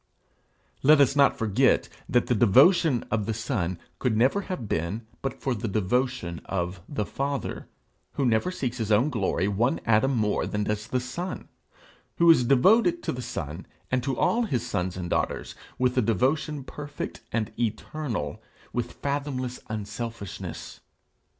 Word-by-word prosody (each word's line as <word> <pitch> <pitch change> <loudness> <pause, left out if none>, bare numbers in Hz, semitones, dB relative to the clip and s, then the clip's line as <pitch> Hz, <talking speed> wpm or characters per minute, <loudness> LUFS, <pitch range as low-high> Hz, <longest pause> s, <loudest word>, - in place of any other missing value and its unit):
Let 150 +2 +6
us 140 0 +4
not 140 -1 +4
forget 115 +4 +3 0.2
that 120 -1 +3
the - - +1
devotion 130 - +5
of 105 -2 0
the 110 - -1
Son 105 - -2 0.2
could 120 -4 +1
never 130 - +3
have 185 - -5
been 90 +7 -2 0.2
but 135 0 -4
for 135 - -1
the 115 0 -3
devotion 110 -2 -1
of 90 -1 -3
the 140 -8 -2
Father, 140 +3 -3 0.5
who 140 - 0
never 115 +7 +2
seeks 125 -9 -3
his 110 -3 -2
own 120 +9 +4
glory 100 -5 0
one 115 +9 +1
atom 115 +4 +3
more 105 -2 +1
than 105 0 -1
does 105 +1 -2
the 130 - 0
Son; 175 +9 -5 0.7
who 170 0 +7
is 140 -6 +5
devoted 220 - +4
to - - -1
the 125 - -5
Son, 75 -5 -5 0.2
and 130 0 +2
to 135 +2 -2
all 235 - +2
his 125 - -1
sons 90 -6 -2
and 90 -2 -4
daughters, - - -1 0.2
with 125 0 +1
a 130 - +4
devotion 135 - 0
perfect 145 +2 -7
and 110 -1 -1
eternal, 115 - -3 0.3
with 120 0 -2
fathomless 140 -3 -3
unselfishness. 110 -1 -6
120 Hz, 155 wpm, -26 LUFS, 105-140 Hz, 0.7 s, who